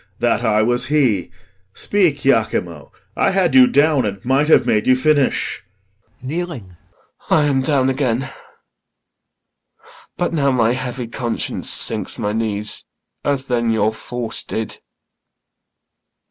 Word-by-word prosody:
That 120 0 0
I 110 -2 +2
was 120 +1 0
he, 125 - +1 0.5
Speak, 170 -9 0
Iachimo. 90 - 0 0.3
I - - +2
had 185 -6 +1
you 130 -1 +7
down, 145 0 +3
and 100 -1 -5
might 135 +4 +2
Have 145 -6 +5
made 110 -3 +1
you 130 - +5
finish. 140 +1 0 0.6
IACHIMO. - - -5
[Kneeling] 140 - -5 0.5
I 155 - +4
am 140 -2 +1
down 135 -1 +1
again; 130 -1 -1 1.9
But 175 -1 -1
now 140 -4 +1
my 120 -3 +2
heavy 125 -1 -4
conscience 120 0 -3
sinks - - +2
my 105 0 -2
knee, 110 -2 -2 0.6
As 140 -2 0
then 120 -3 0
your 110 -1 +1
force 120 0 -6
did. 110 -1 -5
130 Hz, 130 wpm, -19 LUFS, 115-145 Hz, 1.9 s, you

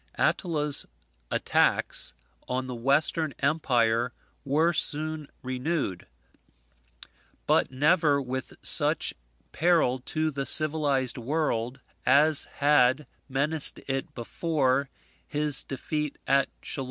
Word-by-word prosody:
Attila's 150 -5 +2 0.4
attacks - - +1 0.3
on 130 +1 -2
the 130 - -6
Western, 140 +4 +1
empire 125 -5 +1 0.3
were 155 +5 +1
soon 155 -1 -1 0.2
renewed; 130 - -3 1.4
but - - +2
never 145 +2 +2
with 130 -1 -5
such - - +4 0.4
peril 160 -7 +2
to 155 +4 -2
the 135 -1 -4
civilized 145 -5 +2
world 125 -2 -2 0.2
as 145 +3 +3
had 145 -1 +2 0.2
menaced 145 +3 +1
it 135 +3 -4
before 135 +1 -1 0.4
his 150 -2 +2
defeat 150 +2 -4
at 135 0 +2
Chalons. - - -5
140 Hz, 95 wpm, -27 LUFS, 130-155 Hz, 1.4 s, such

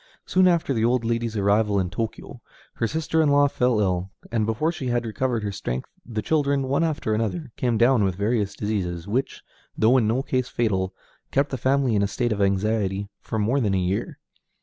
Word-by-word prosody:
Soon 185 0 +4
after 170 -4 +2
the 110 -3 0
old 120 0 +2
lady's 115 -1 -1
arrival 100 0 +2
in 90 -2 -1
Tōkyō, 110 +2 -5 0.3
her 115 - -1
sister 160 +3 0
in 155 - +3
law 145 0 +5
fell 125 -4 +1
ill, 95 -2 0 0.2
and 110 -2 0
before 115 +9 0
she 140 -6 -5
had 120 -1 0
recovered 115 0 -1
her 100 - -2
strength 65 -11 -4 0.2
the 110 -3 -4
children, 140 -3 +1
one 135 +4 +1
after 150 -9 -1
another, 115 - -2
came 120 -3 0
down 120 -1 +4
with 95 -2 0
various 100 0 0
diseases, 90 -5 -3
which, 125 +6 -2 0.3
though 115 +4 +5
in 115 -4 +2
no 120 +5 +1
case 130 -2 -1
fatal, 95 -5 0 0.4
kept 140 +1 +1
the - - -1
family 130 0 +1
in 100 - +2
a 100 - +2
state 120 +4 -1
of 105 -1 -1
anxiety 100 0 0
for 110 - -5
more 115 +6 +1
than 105 -6 +1
a - - +2
year. 90 +2 -2
115 Hz, 205 wpm, -24 LUFS, 100-130 Hz, 0.4 s, law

